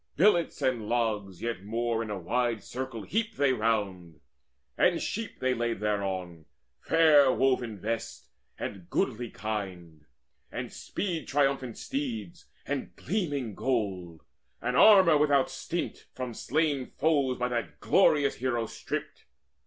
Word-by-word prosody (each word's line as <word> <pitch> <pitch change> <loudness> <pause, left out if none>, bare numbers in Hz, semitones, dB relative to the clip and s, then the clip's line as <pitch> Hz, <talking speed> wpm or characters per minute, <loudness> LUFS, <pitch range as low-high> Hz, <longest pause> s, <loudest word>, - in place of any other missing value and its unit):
Billets 170 -4 +3
and 120 -5 0
logs 105 -6 -1
Yet 115 -5 -3
more 115 +2 -1
in 115 - -4
a 105 - -3
wide 115 +4 -1
circle 130 -3 -5
heaped 225 - -2
they 140 -2 +3
round; 100 -8 -1 0.6
And - - +3
sheep 225 0 -4
they 130 0 +1
laid 120 -3 -1
thereon, 95 -6 -2 0.3
fair 150 -5 +5
woven 125 -5 +1
vests, 115 +4 -4 0.3
And 95 -4 -6
goodly 120 -2 -1
kine, 90 -9 -6 0.4
and - - -5
speed 175 -4 -4
triumphant 135 -4 +1
steeds, 240 - -4 0.2
And 140 -2 -4
gleaming 145 - -2
gold, 95 -10 -2 0.4
and 125 +1 -2
armour 185 -1 +7
without 140 -3 +3
stint, - - -4
From 125 -2 -4
slain 145 0 0
foes 140 -5 +2
by 125 0 -1
that 90 -12 -3
glorious 145 - +3
hero 120 -2 0
stripped. - - -6
120 Hz, 130 wpm, -29 LUFS, 105-145 Hz, 0.6 s, armour